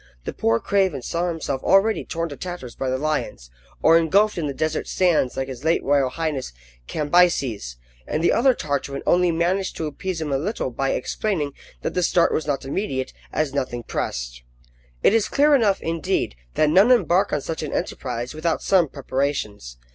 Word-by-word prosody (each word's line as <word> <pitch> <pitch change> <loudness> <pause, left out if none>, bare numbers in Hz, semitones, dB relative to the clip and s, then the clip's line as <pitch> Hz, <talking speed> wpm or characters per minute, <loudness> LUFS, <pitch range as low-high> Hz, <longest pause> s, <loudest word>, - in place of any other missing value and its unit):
The - - -5
poor 115 +1 +1
craven 190 -10 0
saw 170 +6 -1
himself 155 -6 -3
already 205 +3 +3
torn 165 0 -3
to 145 - -7
tatters 175 -7 -7
by 135 - -3
the 130 - 0
lions, 145 - -3 0.3
or 165 +1 +7
engulfed 200 +6 +3
in 165 -4 -2
the - - -2
desert 155 +2 -1
sands 170 -8 +1
like 135 0 -1
his 130 0 -8
late 165 +2 +2
royal 140 -2 +2
highness 150 - -3 0.3
Cambyses, 145 - +1 0.3
and 155 - -1
the - - +4
other 255 +2 +4
Tartarin 140 -1 -3
only 180 0 +3
managed 180 +4 0
to 160 - -2
appease 170 +4 -4
him 155 -2 -3
a 135 - +1
little 175 - -2
by 135 +3 -1
explaining 155 0 -2 0.3
that - - -2
the 180 - 0
start 175 0 +3
was 155 - -1
not 140 -2 -1
immediate, 135 -4 -3 0.2
as 155 -3 -1
nothing 125 -4 -2
pressed. - - -4 0.6
It - - +5
is 225 -2 +3
clear 290 +1 +4
enough, 220 -8 +3
indeed, 165 - -1 0.2
that 155 -1 +3
none 195 +8 +6
embark 195 -5 +3
on 150 - 0
such 160 +3 -4
an 155 - -4
enterprise 125 0 -3
without 155 +1 -1
some 180 -4 +4
preparations. 130 - -3
155 Hz, 185 wpm, -23 LUFS, 135-180 Hz, 0.6 s, or